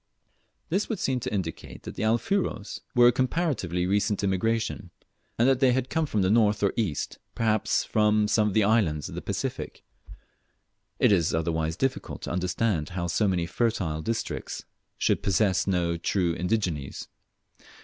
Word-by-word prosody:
This 190 +5 0
would 225 - -1
seem 130 -6 0
to - - -4
indicate 95 -6 -5
that - - -7
the - - -6
Alfuros 115 - 0 0.2
were 120 0 +7
a - - +4
comparatively 130 - 0
recent 100 +1 +1
immigration, 105 0 -1 0.5
and 120 - +4
that 135 -1 +3
they 130 -2 +5
lead 130 0 -1
come 160 -1 +1
from 105 -7 0
the 95 - +2
north 105 -2 +3
or 100 - +2
east, 100 -11 -2 0.2
perhaps 110 -2 +1
from 105 0 +2
some 105 0 +3
of 100 - -2
the 110 - +5
islands 100 -9 +2
of - - -9
the - - -5
Pacific. - - -4 1.1
It - - +4
is 85 -6 +2
otherwise 80 0 -1
difficult 135 +3 -2
to - - -4
understand 90 -2 0
how 85 -1 -3
so 105 +5 +1
many 90 -3 +1
fertile 90 -7 -1
districts 115 +6 -4 0.3
should - - +1
possess 95 -1 +2
no 85 -3 +1
true 85 0 0
indigenes. 90 -5 -2
105 Hz, 160 wpm, -27 LUFS, 90-115 Hz, 1.1 s, were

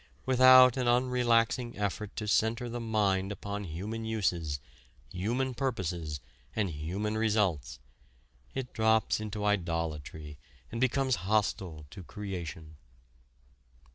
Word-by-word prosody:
Without 130 0 +7
an 125 -2 0
unrelaxing 120 -1 +2
effort 100 0 -3
to 105 - -4
center 115 +3 +1
the 120 +1 -4
mind 105 -4 +1
upon 100 +1 -5
human 100 +7 -5
uses, 90 -9 -1 0.5
human 120 +8 -1
purposes, 90 - -2 0.4
and 100 -5 0
human 90 +8 -3
results, 100 - 0 0.8
it 130 -1 -4
drops 110 -1 +2
into 105 -1 -4
idolatry 80 -6 -2 0.3
and 115 - -4
becomes 130 -1 +2
hostile 95 -7 0
to 95 - -9
creation. 85 -5 -7
105 Hz, 110 wpm, -30 LUFS, 85-115 Hz, 0.8 s, Without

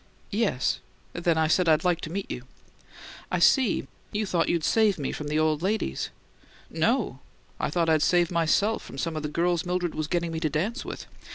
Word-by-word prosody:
"Yes. 200 - +1 0.3
Then 170 -1 +1
I 160 - +3
said 170 +2 +3
I'd 155 -1 +4
like 175 -2 +1
to - - -5
meet 195 +2 -4
you." 125 - -6 0.8
"I 180 - 0
see. 235 +6 +4 0.3
You 210 +1 -1
thought 175 -4 +1
you'd 170 -2 +1
save 215 -1 +3
me 140 -3 -2
from 150 - -5
the 150 +1 0
old 155 -1 +2
ladies." 210 +4 -1 0.6
"No. - - +1 0.4
I - - 0
thought 170 -2 +1
I'd 160 -2 +3
save 175 +1 +3
myself 175 +6 +2
from - - -10
some 165 +3 -2
of 155 - -2
the 150 - -3
girls 170 +2 +1
Mildred 180 -2 -1
was 155 -1 -2
getting 170 0 -1
me 160 - -3
to 160 -1 0
dance 200 - -1
with. - - -7
170 Hz, 200 wpm, -27 LUFS, 155-185 Hz, 0.8 s, I'd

